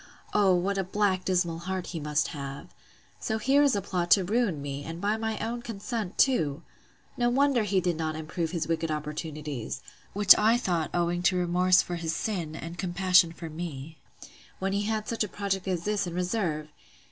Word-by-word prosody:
O, 195 Hz, -3 st, +4 dB
what 195 Hz, +3 st, 0 dB
a -, -, +1 dB
black 190 Hz, -1 st, 0 dB
dismal 175 Hz, -3 st, 0 dB
heart 185 Hz, +1 st, -4 dB
must 150 Hz, -2 st, 0 dB
he -, -, -7 dB
have! 140 Hz, 0 st, -7 dB, 0.5 s
So 220 Hz, -, -1 dB
here 270 Hz, +6 st, +3 dB
is 280 Hz, -5 st, +4 dB
a 200 Hz, -, -1 dB
plot 180 Hz, -3 st, -2 dB
to 185 Hz, +3 st, +6 dB
ruin 205 Hz, -4 st, 0 dB
me, 140 Hz, 0 st, -5 dB
and 165 Hz, +2 st, -6 dB
by 205 Hz, +3 st, +1 dB
my 220 Hz, 0 st, -2 dB
own 235 Hz, +2 st, -3 dB
consent 220 Hz, -3 st, -5 dB
to!—No 205 Hz, -, -1 dB
wonder 270 Hz, 0 st, +3 dB
he 200 Hz, -2 st, +1 dB
did 175 Hz, -2 st, -1 dB
not 160 Hz, -1 st, -2 dB
improve 160 Hz, +1 st, -3 dB
his 165 Hz, -3 st, -2 dB
wicked 165 Hz, 0 st, -1 dB
opportunities, 150 Hz, -, -4 dB, 0.3 s
(which 205 Hz, -1 st, +8 dB
I 220 Hz, +3 st, +4 dB
thought 175 Hz, -9 st, -1 dB
owing 175 Hz, 0 st, 0 dB
to 185 Hz, 0 st, +3 dB
remorse 180 Hz, +1 st, +4 dB
for 175 Hz, -, -4 dB
his 165 Hz, -1 st, -2 dB
sin, 170 Hz, -7 st, -3 dB
and 165 Hz, +1 st, -7 dB
compassion 180 Hz, -2 st, +4 dB
for 165 Hz, 0 st, -8 dB
me,) 155 Hz, -2 st, -7 dB, 0.6 s
when 195 Hz, +1 st, -2 dB
he 205 Hz, +1 st, 0 dB
had 215 Hz, 0 st, -2 dB
such 230 Hz, -1 st, 0 dB
a -, -, -2 dB
project 195 Hz, -2 st, -2 dB
as 180 Hz, -3 st, -1 dB
this 205 Hz, -1 st, 0 dB
in 170 Hz, -, -5 dB
reserve! 180 Hz, -5 st, -1 dB
180 Hz, 190 wpm, -28 LUFS, 165-205 Hz, 0.6 s, which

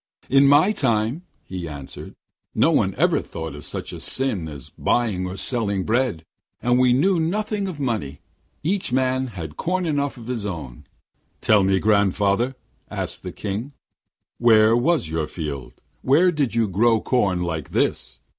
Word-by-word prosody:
'In 135 Hz, +1 st, +6 dB
my 145 Hz, +8 st, +6 dB
time,' 120 Hz, -, 0 dB, 0.2 s
he 90 Hz, -2 st, -6 dB
answered, 70 Hz, -3 st, -8 dB, 0.4 s
'no -, -, +4 dB
one -, -, +2 dB
ever -, -, +2 dB
thought 80 Hz, -2 st, -7 dB
of 75 Hz, -, -9 dB
such -, -, -5 dB
a -, -, -7 dB
sin 120 Hz, -11 st, -1 dB
as 70 Hz, -4 st, -9 dB
buying 105 Hz, -7 st, 0 dB
or 90 Hz, +1 st, -6 dB
selling 100 Hz, -2 st, 0 dB
bread; 115 Hz, -7 st, 0 dB, 0.4 s
and 120 Hz, +1 st, +2 dB
we 125 Hz, -1 st, +4 dB
knew 170 Hz, +8 st, +3 dB
nothing 205 Hz, +4 st, -1 dB
of 175 Hz, -6 st, -6 dB
money. 110 Hz, -, -2 dB, 0.4 s
Each 185 Hz, -1 st, 0 dB
man 130 Hz, 0 st, +1 dB
had 85 Hz, -9 st, -8 dB
corn 185 Hz, +1 st, -1 dB
enough 145 Hz, -4 st, -1 dB
of 115 Hz, -, -10 dB
his 120 Hz, -3 st, -3 dB
own.' 80 Hz, -11 st, -6 dB
'Then -, -, -44 dB
tell 105 Hz, -2 st, +4 dB
me, 95 Hz, 0 st, +3 dB
grandfather,' 105 Hz, +4 st, +2 dB, 0.3 s
asked -, -, -4 dB
the -, -, -6 dB
King, 110 Hz, +7 st, -5 dB, 0.7 s
'where 110 Hz, -1 st, +5 dB
was 135 Hz, -, +2 dB
your 80 Hz, -1 st, -2 dB
field, 75 Hz, -6 st, -6 dB, 0.3 s
where 165 Hz, +8 st, +4 dB
did 145 Hz, -8 st, -1 dB
you 115 Hz, -2 st, +2 dB
grow 110 Hz, +4 st, +3 dB
corn 95 Hz, -9 st, +1 dB
like 80 Hz, -4 st, -3 dB
this?' -, -, -1 dB
115 Hz, 165 wpm, -23 LUFS, 95-135 Hz, 0.7 s, In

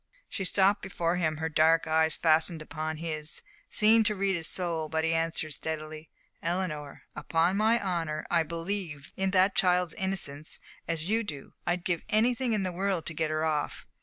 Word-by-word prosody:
She 195 Hz, -, -4 dB
stopped 195 Hz, +2 st, +3 dB
before 175 Hz, -2 st, -1 dB
him, 155 Hz, -3 st, 0 dB
her 160 Hz, +1 st, -1 dB
dark 160 Hz, +1 st, +4 dB
eyes, 160 Hz, 0 st, +2 dB
fastened 160 Hz, 0 st, +3 dB
upon 155 Hz, 0 st, -4 dB
his, 155 Hz, -1 st, -5 dB, 0.3 s
seemed 220 Hz, 0 st, +5 dB
to 210 Hz, -, 0 dB
read 195 Hz, 0 st, +1 dB
his 165 Hz, -2 st, -2 dB
soul, 165 Hz, -4 st, +1 dB
but 160 Hz, 0 st, 0 dB
he 165 Hz, 0 st, +1 dB
answered 165 Hz, -1 st, 0 dB
steadily: 155 Hz, 0 st, -5 dB, 0.3 s
"Eleanor, 165 Hz, -4 st, -3 dB
upon 165 Hz, +4 st, +1 dB
my 220 Hz, +3 st, +3 dB
honor, 165 Hz, -6 st, -2 dB
I 170 Hz, -, +4 dB
believe 165 Hz, -2 st, -4 dB
in 190 Hz, 0 st, 0 dB
that 190 Hz, +1 st, +4 dB
child's 180 Hz, -2 st, +2 dB
innocence 165 Hz, -7 st, -4 dB, 0.3 s
as 165 Hz, -1 st, -1 dB
you 225 Hz, +3 st, +2 dB
do. 145 Hz, -10 st, -7 dB
I'd 175 Hz, +1 st, 0 dB
give 175 Hz, -2 st, 0 dB
anything 235 Hz, +2 st, +2 dB
in 210 Hz, -2 st, +1 dB
the 185 Hz, -, -1 dB
world 185 Hz, -1 st, -1 dB
to 170 Hz, -, -2 dB
get 160 Hz, 0 st, -1 dB
her 155 Hz, 0 st, 0 dB
off. 155 Hz, -2 st, -2 dB
165 Hz, 180 wpm, -29 LUFS, 155-190 Hz, 0.3 s, seemed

